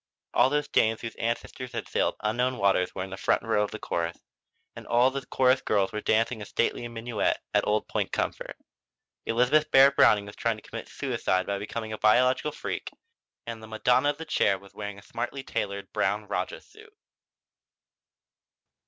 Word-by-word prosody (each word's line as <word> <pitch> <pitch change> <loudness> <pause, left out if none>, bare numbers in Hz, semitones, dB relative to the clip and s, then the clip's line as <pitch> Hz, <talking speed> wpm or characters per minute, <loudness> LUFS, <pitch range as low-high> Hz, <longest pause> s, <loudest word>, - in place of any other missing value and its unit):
All 125 +2 +5
those 150 +1 0
dames 110 0 +2
whose 115 -2 -5
ancestors 120 +2 -3
had - - -4
sailed - - 0
unknown 125 +4 0
waters 95 -3 +2
were 95 - -2
in 95 - -8
the 95 - -6
front - - +1
row 105 - +1
of 105 - 0
the - - -6
chorus, 85 0 -3 0.6
and - - -10
all 125 +2 +4
the 135 0 -4
chorus 130 0 +3
girls 100 -2 +1
were 105 - -4
dancing 110 +1 +1
a - - -5
stately 120 +3 -1
minuet 115 -2 -1 0.2
at - - +2
Old 105 0 +1
Point - - -2
Comfort. - - -3 0.7
Elizabeth 130 +7 +3
Barrett 135 0 +7
Browning 105 -5 +5
was 100 - -10
trying 115 -1 0
to 105 - -14
commit - - -7
suicide 95 0 -1
by 100 0 -2
becoming 110 +1 -5
a 110 - -6
biological 130 +6 +3
freak, - - -5 0.6
and 115 -1 -6
the 110 - -10
Madonna 125 +5 +2
of 145 - -2
the 160 - -7
Chair 100 -10 +2
was 100 +1 -17
wearing 105 -1 -6
a 100 - -13
smartly 135 +4 -5
tailored 100 -4 -4
brown - - 0
rajah - - -3
suit. 435 0 -18
115 Hz, 185 wpm, -27 LUFS, 105-130 Hz, 0.7 s, Barrett